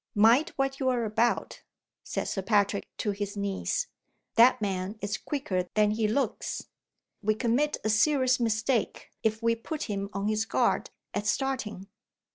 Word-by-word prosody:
"Mind 235 Hz, +10 st, +5 dB
what 270 Hz, 0 st, -1 dB
you 260 Hz, -2 st, +2 dB
are 245 Hz, -2 st, +1 dB
about," 220 Hz, +3 st, 0 dB, 0.4 s
said -, -, -2 dB
Sir 195 Hz, -, -2 dB
Patrick 200 Hz, 0 st, +1 dB
to 210 Hz, -, 0 dB
his 205 Hz, +1 st, -4 dB
niece. 200 Hz, -, -1 dB, 0.5 s
"That 240 Hz, +3 st, +6 dB
man 195 Hz, 0 st, -2 dB
is 205 Hz, +1 st, -2 dB
quicker 195 Hz, -11 st, -2 dB
than 210 Hz, -1 st, +4 dB
he 215 Hz, 0 st, +1 dB
looks. 270 Hz, +6 st, -2 dB, 0.5 s
We 215 Hz, +1 st, +2 dB
commit 250 Hz, +6 st, +1 dB
a 215 Hz, -, 0 dB
serious 255 Hz, +3 st, +3 dB
mistake 225 Hz, +1 st, 0 dB
if 220 Hz, +1 st, 0 dB
we 230 Hz, 0 st, +3 dB
put 295 Hz, +7 st, -5 dB
him 200 Hz, -2 st, -3 dB
on 200 Hz, 0 st, -2 dB
his 215 Hz, +1 st, +1 dB
guard -, -, +1 dB, 0.2 s
at 205 Hz, +1 st, -2 dB
starting." 255 Hz, -8 st, -1 dB
220 Hz, 155 wpm, -28 LUFS, 205-255 Hz, 0.5 s, That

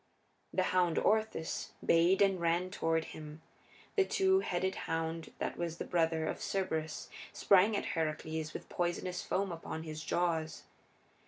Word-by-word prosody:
The 185 Hz, -, +1 dB
hound 175 Hz, -3 st, +3 dB
Orthus 215 Hz, -7 st, 0 dB
bayed 175 Hz, +4 st, +5 dB
and 195 Hz, -2 st, +2 dB
ran 170 Hz, +2 st, +1 dB
toward 165 Hz, -3 st, +1 dB
him; 155 Hz, 0 st, -9 dB, 0.5 s
the 395 Hz, -, +5 dB
two 380 Hz, 0 st, +3 dB
headed 190 Hz, -, -1 dB, 0.2 s
hound 165 Hz, 0 st, -2 dB
that -, -, -3 dB
was 170 Hz, -1 st, -3 dB
the -, -, -4 dB
brother 160 Hz, -2 st, +1 dB
of -, -, -2 dB
Cerberus 160 Hz, -5 st, -2 dB, 0.3 s
sprang 200 Hz, +2 st, +5 dB
at -, -, -2 dB
Heracles 160 Hz, 0 st, -2 dB
with -, -, -7 dB
poisonous 180 Hz, +1 st, -2 dB
foam 195 Hz, 0 st, -1 dB
upon 165 Hz, -1 st, -5 dB
his 155 Hz, -1 st, -6 dB
jaws. 165 Hz, -2 st, -1 dB
170 Hz, 145 wpm, -33 LUFS, 160-185 Hz, 0.5 s, bayed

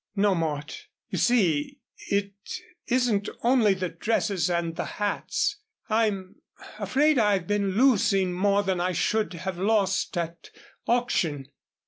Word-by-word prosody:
"No, 200 Hz, 0 st, +3 dB
Mort, 155 Hz, -3 st, -3 dB, 0.2 s
you -, -, -2 dB
see, 175 Hz, -12 st, +2 dB, 0.3 s
it 200 Hz, 0 st, 0 dB, 0.5 s
isn't 240 Hz, -5 st, +1 dB
only 235 Hz, -5 st, +4 dB
the 185 Hz, -1 st, -3 dB
dresses 185 Hz, -1 st, 0 dB
and 170 Hz, -1 st, -1 dB
the -, -, -2 dB
hats. 205 Hz, -, -1 dB, 0.3 s
I'm 210 Hz, -4 st, 0 dB, 0.4 s
afraid 270 Hz, +8 st, +2 dB
I've 205 Hz, -5 st, +2 dB
been 200 Hz, -1 st, 0 dB
losing 195 Hz, -7 st, +3 dB
more 200 Hz, +2 st, +2 dB
than 185 Hz, -2 st, -1 dB
I 180 Hz, +1 st, 0 dB
should 215 Hz, +4 st, 0 dB
have 180 Hz, +1 st, -5 dB
lost 195 Hz, -2 st, +1 dB
at 170 Hz, 0 st, -4 dB, 0.4 s
auction." 165 Hz, -, 0 dB
195 Hz, 125 wpm, -26 LUFS, 175-215 Hz, 0.5 s, only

